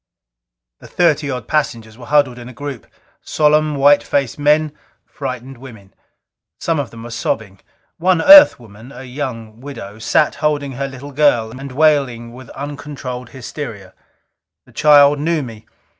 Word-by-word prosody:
The - - -14
thirty 155 -4 +1
odd 125 -4 -5
passengers 115 -7 -2
were 120 0 -13
huddled 145 -5 +2
in 120 +1 -10
a - - -11
group. 140 -2 -8 0.3
Solemn, 150 0 +1
white 145 +1 +5
faced 140 0 -2
men; 150 +1 +2 0.3
frightened 130 -2 -7
women. 110 -7 -14 0.7
Some 165 -2 -1
of 135 -5 -3
them 115 -1 -12
were 120 - -9
sobbing. 105 -4 -4 0.4
One 180 0 +2
Earth 290 - +8
woman 110 +2 -14
a 125 0 -10
young 125 -4 -7
widow 110 -7 -9
sat 150 +6 +1
holding 145 -2 -1
her 135 +2 -4
little 135 +1 -10
girl, 130 -6 +2
and 135 +3 -9
wailing 130 -5 +1
with 125 -1 -13
uncontrolled 135 -3 -7
hysteria. 115 -6 -8 0.7
The - - -21
child 145 -1 +5
knew 160 0 -1
me. 110 -3 -11
135 Hz, 150 wpm, -17 LUFS, 120-145 Hz, 0.7 s, Earth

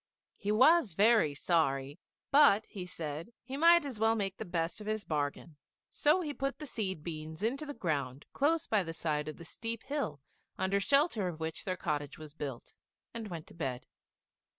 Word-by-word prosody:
He 205 - -2
was 260 - +5
very 210 -7 +4
sorry; 140 -3 +1 0.3
but, 275 -7 +6
he 185 -3 -7
said, 160 +4 -5
he 260 +2 -6
might 335 +2 +6
as 255 -6 -5
well 225 +1 +4
make 195 -3 -2
the - - -5
best 170 +3 -2
of 210 - -8
his 215 -1 -1
bargain, 150 0 -3 0.3
so 300 +5 +3
he 300 -4 -3
put 275 -1 -2
the 300 - -7
seed 190 - -3
beans 160 +1 -6
into 275 +7 -1
the 290 - -5
ground 145 - -2
close 310 +3 +2
by 215 -2 +2
the 165 -3 -5
side 150 -2 -1
of 155 - -6
the 170 - -10
steep 230 +6 -5
hill 275 - -3 0.4
under 190 +2 +1
shelter 275 - +2
of 165 -3 -5
which 160 0 -4
their 185 -1 -2
cottage 150 -4 -2
was 155 -2 -10
built, 140 -6 -6 0.4
and 230 -2 -5
went 170 -5 -6
to - - -14
bed. 130 -6 -4
190 Hz, 190 wpm, -32 LUFS, 155-235 Hz, 0.4 s, but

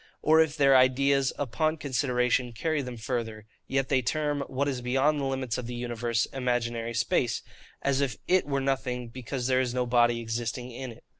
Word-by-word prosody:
Or 155 +1 +5
if 160 -1 0
their 135 -2 +5
ideas, 135 +1 +4
upon 155 +4 0
consideration, 125 -3 0
carry 155 +5 -1
them 125 -2 -6
further, 110 -2 -4 0.2
yet 135 0 0
they 130 -2 +3
term 145 +3 -1
what 140 +2 -1
is 130 -3 -2
beyond 135 +5 +2
the 140 - -1
limits 130 -3 -2
of 120 - -6
the 120 - -5
universe, 120 -1 -1
imaginary 120 -2 -1
space: 120 +1 0 0.4
as 140 0 +1
if 125 -6 -1
IT 185 -4 +3
were 140 -1 0
nothing, 125 -3 -2
because 125 +1 -5
there 130 0 +3
is 125 -1 -2
no 125 0 +1
body 120 -1 +3
existing 120 +2 -4
in 125 +1 -6
it. 115 - -15
125 Hz, 190 wpm, -28 LUFS, 120-140 Hz, 0.4 s, Or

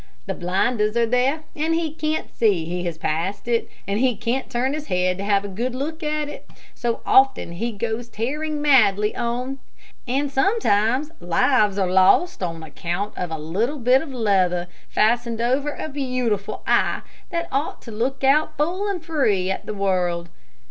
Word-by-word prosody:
The - - -2
blinders 210 +5 0
are 235 - +4
there 255 +6 +1
and 315 +2 0
he 325 -2 -1
can't 310 0 -3
see 195 -8 +2
that 165 - -6
he 180 0 -2
has 170 -2 -3
passed 170 +7 -2
it, 235 -1 0 0.2
and 200 +2 0
he 255 -1 +2
can't 240 +5 -2
turn 255 +3 0
his 300 0 -5
head 180 0 +1
to - - -3
have 200 0 +2
a - - -3
good 235 +6 -3
look 315 +5 -4
at 300 -1 -1
it. 295 - -10 0.2
So 235 -2 -2
often 265 -9 +4
he 230 +8 -3
goes 230 +2 -3
tearing 295 +7 -3
madly 215 -7 +4
on; 250 +3 -2 0.5
and 275 +3 0
sometimes 270 - +2
lives 205 +4 +2
are 190 -2 +2
lost 190 - +4
all 170 -2 -2
on 165 - -10
account 175 +6 -4
of 180 - -3
a 160 - -3
little 200 - -1
bit 255 +1 +4
of 320 - -7
leather 190 -7 +1 0.2
fastened 230 +1 +1
over 260 +5 +1
a - - -4
beautiful 255 -8 -2
eye - - +2 0.3
that 335 -2 -2
ought 275 +4 -1
to 230 - -9
look 245 +6 -2
out 305 +3 +3
full 360 +7 0
and 360 -5 -4
free 215 - +1
at - - -4
the - - -3
world. 180 -3 0
235 Hz, 185 wpm, -23 LUFS, 195-280 Hz, 0.5 s, are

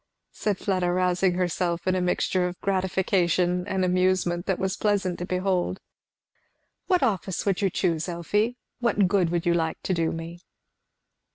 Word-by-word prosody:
said 205 -3 -1
Fleda, 185 -3 0
rousing 180 0 +2
herself 175 -1 -1
in 185 - +2
a 185 - 0
mixture 180 0 +1
of 180 0 -7
gratification 185 -2 +1
and 190 -2 0
amusement 180 -1 +1
that 190 -2 +1
was 190 +1 -1
pleasant 200 -5 0
to 175 - -4
behold. 185 0 0 1.1
"What 365 -2 +3
office 190 -3 -1
would 195 -1 +1
you 195 - +2
choose, 170 -2 -1
Elfie? 205 +8 0 0.2
what 220 -5 +2
good 185 -3 +2
would 170 0 -1
you 175 - +3
like 160 -2 -1
to 190 - 0
do 165 -2 0
me?" 165 +1 -7
185 Hz, 160 wpm, -26 LUFS, 175-190 Hz, 1.1 s, What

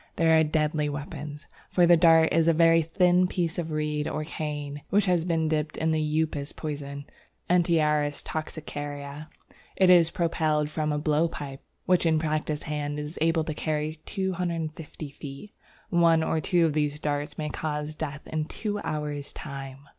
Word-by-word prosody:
They 165 -1 +3
are 160 0 +6
deadly 150 -1 0
weapons, 150 +1 -6 0.2
for 175 - +4
the 175 0 +7
dart 165 -1 +5
is 165 0 +3
a 165 - +5
very 165 +1 +5
thin 180 +2 +3
piece 175 -2 -1
of 165 -2 -3
reed 150 -1 -1
or 155 - -2
cane, 145 -2 -5
which 205 +1 +3
has 175 -3 +2
been 165 -2 +1
dipped 155 0 -1
in 160 0 +1
the 155 0 +1 0.2
Upas 145 -2 -4
poison 140 -2 -5 0.5
(Antiaris 150 -4 +2
toxicaria). 145 -1 -6 0.5
It 185 -1 +5
is 170 -2 +6
propelled 155 -3 0
from 155 -1 -1
a 150 - 0
blow 150 +2 +2
pipe, 140 -4 -7 0.2
which 180 -2 +3
in 160 -1 +3
practised 155 -1 -1
hands 150 -1 -3
is 150 +3 -6
able 165 0 +3
to 155 - -3
carry 155 0 -2
250 165 -5 -3
feet. 140 +7 -9 0.4
One 170 -2 +4
or 160 0 0
two 175 -1 +3
of 155 - +1
these 150 -1 0
darts 145 -1 -2
may 150 -1 -2
cause 150 0 -3
death 150 -1 -6
in 155 -1 -2
two 205 +4 -3
hours' 150 -4 -3
time. 135 -2 -8
155 Hz, 170 wpm, -27 LUFS, 150-165 Hz, 0.5 s, the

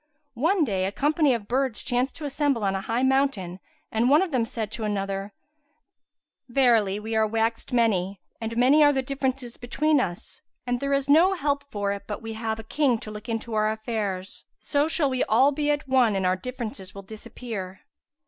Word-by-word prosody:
One 335 +5 +3
day, 195 -8 0
a 195 - -1
company 295 +5 +2
of 210 -3 -6
birds 255 -2 0
chanced 250 +2 0
to 315 - -6
assemble 280 -4 0
on 195 -1 +1
a 195 - -2
high 230 +5 -1
mountain 265 -10 +1 0.3
and 230 +3 +2
one 295 +6 +6
of 375 - -4
them 250 -4 +1
said 220 -2 -5
to 225 0 -5
another, 195 -1 -2 1.2
"Verily, 230 -6 +3
we 220 +1 -4
are 220 0 +3
waxed 225 +3 -1
many, 200 -6 +1 0.2
and 225 +1 -4
many 270 +5 +5
are 290 - +6
the 265 -2 0
differences 260 -2 -3
between 290 +5 +1
us, 175 -8 -4 0.2
and 245 0 -1
there 280 +1 -2
is 275 0 +1
no 330 +7 +5
help 285 -4 -1
for 205 -4 -2
it 200 0 -6
but 210 - -4
we 225 0 -5
have 220 0 -3
a - - -7
king 260 +1 +1
to 215 - -9
look 210 +3 -9
into 225 0 -3
our 215 0 +2
affairs; 215 -4 -4
so 290 0 0
shall 320 -2 +1
we 255 0 +1
all 260 +6 +4
be 295 +1 -1
at 290 -1 0
one 255 -5 +3
and 190 -1 0
our 185 0 +3
differences 215 -4 -6
will 195 - -8
disappear." 205 -2 -7
235 Hz, 200 wpm, -25 LUFS, 210-275 Hz, 1.2 s, one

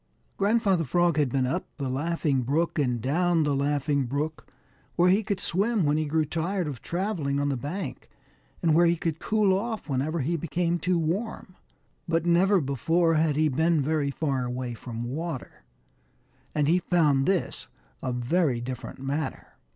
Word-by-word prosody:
Grandfather 200 -4 +2
Frog 170 +3 +2
had 145 -4 +2
been 130 +1 +1
up 165 +9 -2
the 140 -3 -3
Laughing 145 0 0
Brook 155 +7 0
and 125 -4 +1
down 165 +7 +2
the 145 -1 +1
Laughing 140 0 0
Brook, 150 +4 -3 0.5
where 180 +1 +4
he 200 +3 +4
could 205 -3 -2
swim 200 +1 +1
when 145 +1 +2
he 155 0 0
grew 155 +1 +1
tired 175 +4 -2
of 140 -5 -5
traveling 170 -7 -2
on 145 0 0
the 140 - 0
bank, 145 +11 -5 0.5
and 165 -2 +4
where 170 +2 +5
he 170 - +3
could 165 -2 -3
cool 210 -1 +2
off 220 0 -3
whenever 145 +4 -1
he 165 +6 0
became 170 +2 -1
too 180 +1 +1
warm, 185 +4 -3 0.5
but 165 0 +1
never 185 +3 +4
before 165 +4 +1
had 155 -2 +2
he 155 +1 +3
been 160 +3 +2
very 145 0 0
far 140 -2 -1
away 125 0 -3
from 115 0 -6
water, 145 +3 -5 0.9
and 150 -1 +2
he 175 +4 +4
found 150 -7 +2
this 190 -2 -1 0.3
a 130 - -2
very 125 +2 +1
different 125 0 -6
matter. 135 +2 -4
155 Hz, 170 wpm, -27 LUFS, 140-175 Hz, 0.9 s, where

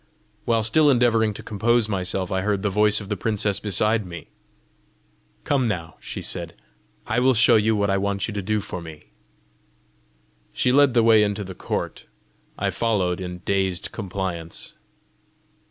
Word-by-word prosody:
While 115 -1 +2
still 145 +7 +4
endeavouring 115 -4 +3
to - - -9
compose 115 +2 +1
myself, 95 -2 -2
I 95 0 0
heard 100 0 -1
the 100 - 0
voice 105 +1 +2
of 100 - -10
the 105 - -1
princess 105 0 -1
beside 105 +2 0
me. 85 -2 -9 1.1
"Come 135 -4 +1
now," 85 -6 -4
she - - -6
said; - - -4 0.5
"I 110 +3 0
will 130 0 +3
show 110 - +5
you 110 0 +3
what 100 -1 +1
I 100 - +1
want 100 0 -1
you 110 - -5
to 100 - -3
do 105 +2 -1
for 90 - -6
me." 80 -2 -12 1.4
She 125 - +1
led 140 -1 +4
the 115 - +5
way 110 -1 +6
into 105 0 0
the 95 -1 -8
court. - - -4 0.5
I - - -1
followed 95 -6 0
in 90 -1 -7
dazed 95 -3 -1
compliance. 95 -5 -5
105 Hz, 165 wpm, -23 LUFS, 95-115 Hz, 1.4 s, way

